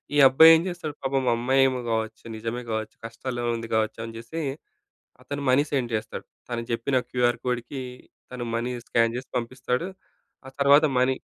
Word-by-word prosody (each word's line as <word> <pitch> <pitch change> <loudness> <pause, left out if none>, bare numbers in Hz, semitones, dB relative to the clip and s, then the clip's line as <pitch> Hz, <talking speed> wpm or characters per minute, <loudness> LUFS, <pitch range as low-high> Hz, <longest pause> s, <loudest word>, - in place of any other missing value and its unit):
ఈ - - +3
అబ్బాయి 160 +5 +8
ఏం 160 - +2
చేస్తాడు. 175 -4 -5
పాపం 135 0 0
అమ్మాయేమో 130 +2 +2
గావొచ్చు, 110 -1 -2
నిజమే 115 +2 -4
గావొచ్చు, 110 -1 -3
కష్టాలో 120 +2 -5
ఉంది 115 0 -5
గావొచ్చు 110 0 0
అనిజేసి 115 +8 -6 0.8
అతను 145 0 -5
మనీ 130 +3 +5
సెండ్ 130 -4 -1
చేస్తాడు. 110 +1 -4 0.2
తను 120 -1 -3
చెప్పిన 115 +3 0
క్యూఆర్ 120 -1 +1
కోడ్‌కి 125 +2 -3 0.5
తను 125 -1 -5
మనీ 120 +2 -1 0.2
స్కాన్ 115 -1 +2
చేసి 130 +1 -6
పంపిస్తాడు. 125 +4 -2 0.6
ఆ - - -8
తరువాత 140 +2 +6
మనీ 130 +1 +3
125 Hz, 155 wpm, -25 LUFS, 115-135 Hz, 0.8 s, అబ్బాయి